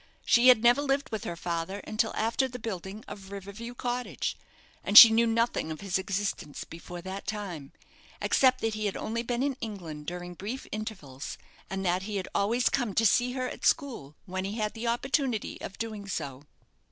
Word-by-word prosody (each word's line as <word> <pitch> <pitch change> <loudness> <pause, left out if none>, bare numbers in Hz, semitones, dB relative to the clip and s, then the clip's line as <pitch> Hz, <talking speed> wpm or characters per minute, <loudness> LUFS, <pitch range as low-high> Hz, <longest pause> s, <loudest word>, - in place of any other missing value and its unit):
She 240 +1 +5
had 245 -3 +7
never 240 +4 +6
lived 280 -1 0
with 220 -2 -4
her 170 - -3
father 170 +3 -3
until 220 +1 -1
after 230 +4 +1
the 250 -1 -7
building 210 -2 -6
of 195 -2 -9
River 200 0 -7
View 235 +4 -8
Cottage, 245 0 -2 0.5
and 205 - +4
she 230 -2 +14
knew 230 +1 +4
nothing 230 -6 +1
of 155 - -6
his 195 -2 0
existence 195 -6 -3
before 175 +1 -9
that 190 +1 -6
time, 180 -10 -5 0.5
except 255 -1 +3
that 225 -1 0
he 215 -1 -1
had 195 - -3
only 230 +1 -2
been 240 +1 -1
in 275 -2 -1
England 170 -9 -6
during 180 0 -5
brief 215 +9 -6
intervals, 205 -12 -6 0.3
and 195 0 -3
that 180 +1 +2
he 205 +2 -5
had 190 -2 -2
always 230 +5 +2
come 240 -7 0
to 225 - +3
see 245 +4 +3
her 255 -1 -2
at - - -8
school 225 - 0
when 185 -1 -3
he 195 +2 -3
had 215 0 -2
an 230 +1 -4
opportunity 250 -1 -1
of 195 - -7
doing 215 -3 -5
so. 140 -6 -5
215 Hz, 195 wpm, -29 LUFS, 190-235 Hz, 0.5 s, she